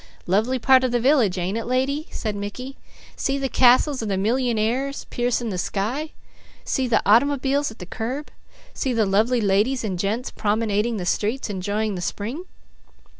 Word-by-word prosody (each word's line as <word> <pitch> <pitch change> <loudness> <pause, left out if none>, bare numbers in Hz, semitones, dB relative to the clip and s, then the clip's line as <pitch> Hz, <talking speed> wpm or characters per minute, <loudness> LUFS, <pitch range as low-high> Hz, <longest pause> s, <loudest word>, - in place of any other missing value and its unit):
"Lovely 220 +8 +1
part 260 +1 +5
of 255 - +1
the 240 - +1
village, 240 -7 +3
ain't 185 +5 -1
it, - - -5
lady?" 265 +5 -1
said 215 -2 -4
Mickey. 230 +7 -6 0.4
"See 275 0 -1
the 275 -1 -1
castles 260 +2 +4
of 220 - -3
the 195 - 0
millyingaires 245 +4 0
piercing 240 -1 0
the 185 -3 -3
sky; 240 - -2 0.5
see 260 -1 0
their 230 -2 +2
automobiles 275 +5 +3
at 220 - -12
the 180 - -8
curb; 250 +10 -5 0.4
see 260 - -1
the 225 -2 +2
lovely 220 +5 +2
ladies 215 +6 +2
and 190 -5 -3
gents 215 +6 -2
promenading 215 +1 0
the 180 - -4
streets 215 +5 -1
enjoying 205 +3 -2
the 180 - -4
spring?" 235 - -4
230 Hz, 170 wpm, -23 LUFS, 205-260 Hz, 0.5 s, part